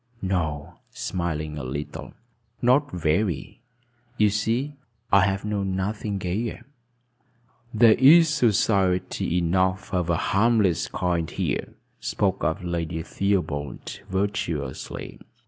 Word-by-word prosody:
"No," 80 -6 -2
smiling 75 -4 -3
a - - -6
little. 70 +3 -6 0.4
"Not 130 +4 +3
very. 85 - -1 0.6
You 105 -1 +4
see, 115 +8 -1 0.4
I 100 - +7
have 95 0 -1
known 100 -3 -1
nothing 100 +1 -2
gayer." 95 +5 -3 1.1
"There 115 -1 +6
is 160 +8 +7
society 95 - +1
enough 95 +2 0
of 90 -1 0
a 85 - +2
harmless 105 -2 +2
kind 85 -3 -1
here," - - -3 0.2
spoke - - -1
up - - 0
Lady 85 -1 -3
Theobald 80 -9 -2
virtuously. 95 -8 -3
95 Hz, 105 wpm, -25 LUFS, 85-105 Hz, 1.1 s, I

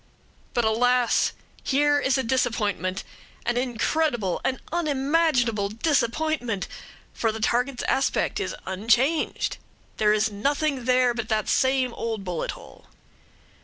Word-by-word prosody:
But, 240 -2 +2
alas! 245 +2 +3 0.3
here 290 +1 +3
is 270 -1 +1
a 265 - 0
disappointment; 215 -6 -1 0.4
an 240 - 0
incredible, 245 - 0
an 260 - -1
unimaginable 280 -8 +1
disappointment 245 - 0 0.5
for 225 - 0
the 220 - -6
target's 245 +4 0
aspect 270 - 0
is - - -3
unchanged; 230 - +1 0.4
there 210 -1 +3
is 215 +1 +2
nothing 275 +4 -1
there 250 -1 +3
but 235 -2 -4
that 215 -1 0
same 260 -2 +2
old 225 -3 -4
bullet 180 -3 -3
hole! - - -15
245 Hz, 120 wpm, -25 LUFS, 220-270 Hz, 0.5 s, alas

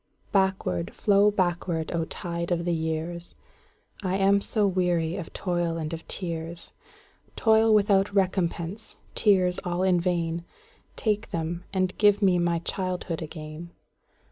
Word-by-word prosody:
Backward, 190 - 0
flow 205 0 +4
backward, 175 -4 -1
O 165 -1 0
tide 170 +1 -4
of 170 -1 0
the 175 - +1
years!I 170 +3 -5
am 200 +1 +4
so 210 0 +1
weary 175 -3 +1
of 180 -4 -6
toil 175 -2 -1
and 160 0 -4
of 165 - -7
tears,—Toil 175 +6 -2
without 200 -2 +4
recompense, 190 +1 -1 0.2
tears 185 -4 +3
all 175 0 -1
in 180 -2 +3
vain,—Take 180 - -3
them, 170 +2 -3
and 185 -1 0
give 205 -1 +5
me 185 -2 +4
my 170 -1 +1
childhood 180 -1 -3
again! 155 +1 -8
175 Hz, 120 wpm, -26 LUFS, 170-195 Hz, 0.2 s, give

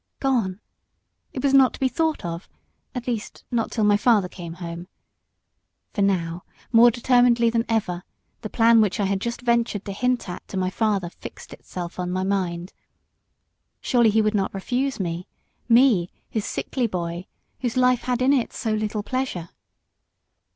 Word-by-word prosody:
Gone! 230 -9 0 0.7
It 255 - -5
was 275 -1 +2
not 265 -2 +6
to - - -14
be 265 - +2
thought 315 - -1
of 170 +1 -5 0.5
at 250 -1 -4
least, 235 -4 -4
not 235 -2 0
till 220 - -1
my 205 0 +5
father 210 -4 +3
came 170 -2 -8
home. 170 0 -7 1.1
For 205 - -1
now, 175 -3 0 0.3
more 235 0 +8
determinedly 240 -1 +3
than 230 0 +1
ever, 190 -6 0 0.4
the 215 - -5
plan 230 0 +5
which 210 0 +1
I 200 - +2
had 195 0 -1
just 235 +1 -3
ventured 235 -4 0
to 200 - -4
hint 250 +4 0
at 180 - -7
to 195 - -6
my 185 0 0
father 200 -4 0
fixed - - -11
itself 175 0 -7
on 180 0 -2
my 185 +1 -1
mind. 185 -2 -2 1.1
Surely 235 -3 +3
he 220 +1 +3
would 215 0 +1
not 195 -1 -1
refuse 255 +7 -1
me 175 -1 -3 0.4
me, 230 -7 +5 0.2
his 215 -2 -2
sickly 250 -3 -2
boy, 175 -2 -4 0.3
whose 245 -1 -2
life 250 -1 +4
had 250 0 0
in 270 +2 +4
it 255 -4 0
so 220 - -2
little 215 -1 -2
pleasure. 255 -10 -3
215 Hz, 170 wpm, -24 LUFS, 185-245 Hz, 1.1 s, more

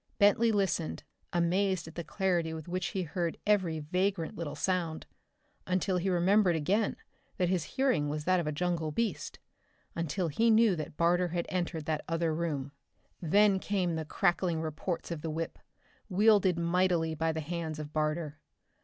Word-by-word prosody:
Bentley 220 +2 +4
listened, 175 - -1 0.3
amazed 180 +1 +1
at 160 - -10
the 170 - -5
clarity 175 -4 0
with 160 0 -8
which 180 0 -2
he 185 +1 -2
heard 170 +1 -2
every 190 -6 +2
vagrant 180 +3 -1
little 160 -3 -5
sound 175 -4 -1 0.6
until 185 +1 +1
he 185 +2 0
remembered 185 +1 +3
again 200 +8 +1 0.4
that 180 -1 +1
his 180 -3 +1
hearing 255 - +2
was 150 +1 -3
that 185 +2 +3
of 165 - -2
a - - 0
jungle 165 0 -1
beast 170 -6 -2 0.6
until 170 +2 -1
he 225 +10 +2
knew 220 -3 +5
that 155 -2 -6
Barter 175 +2 +3
had 170 0 -2
entered 175 -4 -2
that 155 -1 -1
other 165 -1 0
room. 150 -4 -2 0.5
Then 200 +3 +4
came 185 -4 -1
the 160 0 -2
crackling 175 0 +1
reports 160 +3 -4
of 165 -3 -4
the 165 - -3
whip, 160 +1 -4 0.5
wielded 200 -2 +4
mightily 170 -1 +1
by 160 +1 0
the 160 - -3
hands 160 0 -4
of 150 0 -7
Barter. 155 0 -1
170 Hz, 165 wpm, -30 LUFS, 160-190 Hz, 0.6 s, knew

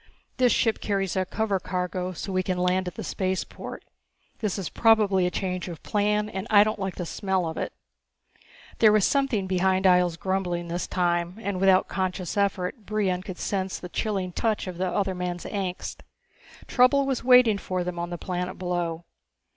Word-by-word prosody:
This 250 -2 +4
ship 225 0 +1
carries 195 -3 -1
a 190 0 +1
cover 210 -2 0
cargo 180 0 -3
so 185 +2 -6
we 185 - +2
can 185 0 -2
land 180 +1 +1
at 180 - -5
the - - -5
spaceport. 190 -1 -4 0.5
This 210 -4 -1
is 190 -4 -3
probably 210 -5 +3
a - - +1
change 185 -1 -3
of 170 -4 -8
plan 210 0 +1
and 195 0 -5
I 205 -1 +7
don't 215 0 -2
like 190 -1 -3
the 180 - -4
smell 190 0 -1
of 160 - -4
it." - - -3 1.1
There 215 -2 +7
was 210 -2 +4
something 270 -8 +1
behind 190 +1 +1
Ihjel's 180 -2 +4
grumbling 180 -3 -2
this 175 +1 -2
time, 175 -1 0
and 200 -4 -3
without 190 -1 +4
conscious 185 -2 -2
effort 200 +2 -1
Brion 195 -4 0
could 185 -1 -7
sense 190 -2 -2
the 180 - -8
chilling 195 -3 -2
touch 220 +4 -1
of 180 -2 -7
the 185 - +1
other 195 +1 0
man's 180 -1 -4
angst. 190 -3 -4 0.7
Trouble 270 +2 +4
was 270 -2 -1
waiting 250 -5 +6
for 185 -2 -2
them 175 -1 -4
on 170 0 -3
the 175 - -4
planet 180 +1 -4
below. 175 -2 -2
190 Hz, 185 wpm, -26 LUFS, 180-205 Hz, 1.1 s, I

